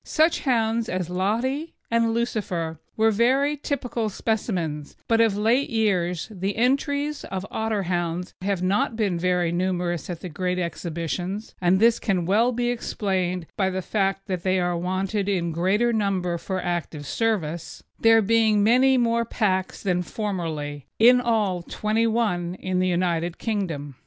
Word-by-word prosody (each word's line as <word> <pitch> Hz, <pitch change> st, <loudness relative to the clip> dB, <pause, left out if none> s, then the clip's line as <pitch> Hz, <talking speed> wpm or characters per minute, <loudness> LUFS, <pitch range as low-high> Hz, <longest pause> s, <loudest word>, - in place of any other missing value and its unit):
Such 320 Hz, +1 st, +2 dB
hounds 230 Hz, -3 st, +1 dB
as 180 Hz, -2 st, -2 dB
Lottery 235 Hz, -, -1 dB, 0.2 s
and 230 Hz, 0 st, +3 dB
Lucifer 185 Hz, -9 st, -2 dB, 0.2 s
were 220 Hz, 0 st, +4 dB
very 265 Hz, +7 st, +2 dB
typical 245 Hz, -6 st, -2 dB
specimens; 180 Hz, -9 st, -2 dB
but 230 Hz, 0 st, +4 dB
of 220 Hz, -3 st, +3 dB
late 235 Hz, +6 st, +2 dB
years 185 Hz, -, 0 dB
the 195 Hz, 0 st, -3 dB
entries 285 Hz, +4 st, 0 dB
of 190 Hz, 0 st, -4 dB
Otterhounds 180 Hz, -5 st, -2 dB
have 190 Hz, -1 st, -1 dB
not 200 Hz, +4 st, +1 dB
been 200 Hz, -6 st, 0 dB
very 180 Hz, -1 st, +1 dB
numerous 175 Hz, -1 st, -1 dB
at 175 Hz, -2 st, -5 dB
the -, -, -5 dB
great 180 Hz, +3 st, -2 dB
exhibitions, 175 Hz, +3 st, -4 dB
and 180 Hz, +1 st, +3 dB
this 230 Hz, +1 st, +4 dB
can 185 Hz, -5 st, 0 dB
well 220 Hz, +7 st, +3 dB
be 240 Hz, 0 st, 0 dB
explained 185 Hz, -6 st, -2 dB
by 190 Hz, -2 st, +1 dB
the 190 Hz, 0 st, -3 dB
fact 195 Hz, -1 st, -1 dB
that 185 Hz, -2 st, -3 dB
they 185 Hz, +1 st, +1 dB
are 175 Hz, -1 st, 0 dB
wanted 190 Hz, +3 st, -1 dB
in 175 Hz, -4 st, 0 dB
greater 195 Hz, +8 st, +1 dB
numbers 185 Hz, -5 st, 0 dB
for 190 Hz, -1 st, -3 dB
active 170 Hz, -4 st, -3 dB
service, 170 Hz, -5 st, -2 dB, 0.2 s
there 225 Hz, -1 st, +5 dB
being 220 Hz, -1 st, +3 dB
many 255 Hz, +4 st, +5 dB
more 235 Hz, -1 st, +2 dB
packs 190 Hz, -5 st, -1 dB
than 180 Hz, -3 st, +1 dB
formerly 160 Hz, -, -4 dB
in 245 Hz, +2 st, +6 dB
all, 210 Hz, -7 st, +1 dB
twenty 215 Hz, +5 st, 0 dB
one 190 Hz, -6 st, 0 dB
for 185 Hz, -, -4 dB
the 185 Hz, 0 st, +2 dB
United 175 Hz, -1 st, 0 dB
Kingdom. 165 Hz, -10 st, -3 dB
195 Hz, 150 wpm, -24 LUFS, 175-225 Hz, 0.2 s, in